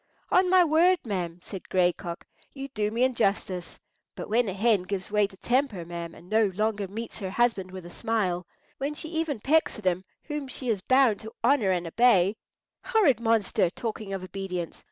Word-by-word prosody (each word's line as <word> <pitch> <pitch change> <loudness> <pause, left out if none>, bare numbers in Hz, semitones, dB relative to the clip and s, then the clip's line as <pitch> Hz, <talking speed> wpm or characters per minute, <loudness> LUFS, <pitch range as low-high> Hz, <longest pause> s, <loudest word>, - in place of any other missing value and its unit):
"On 365 0 +4
my 370 -1 +6
word, 340 +3 +4
ma'am," 180 -5 -3
said 190 -3 -9
Gray 180 -1 +3
Cock, 170 0 -7 0.3
"you 275 0 -6
do 210 -4 -1
me 230 +3 0
injustice. 200 -7 0 0.4
But - - -7
when 230 0 +2
a - - -3
hen 210 0 +3
gives 190 +1 -5
way 210 -1 +3
to 190 - -17
temper, 240 -7 0
ma'am, 170 0 -6
and 175 - -15
no 215 +2 +3
longer 210 -1 0
meets 225 +4 -6
her 195 -3 -4
husband 205 -3 +1
with 185 -1 -9
a 175 - -10
smile—when 220 - -3
she 315 - -5
even 320 -6 -2
pecks 310 +8 +2
at 215 - -11
him 185 0 +1 0.2
whom 295 -2 -4
she 255 -1 -4
is 210 -4 0
bound 255 -2 +4
to 220 0 -9
honour 240 -5 +3
and 180 -2 0
obey—" 200 0 +4 0.5
"Horrid 410 - +3
monster! 225 -6 +2
talking 215 +1 -5
of 195 -1 -4
obedience! 185 -2 -5
210 Hz, 190 wpm, -27 LUFS, 185-255 Hz, 0.5 s, my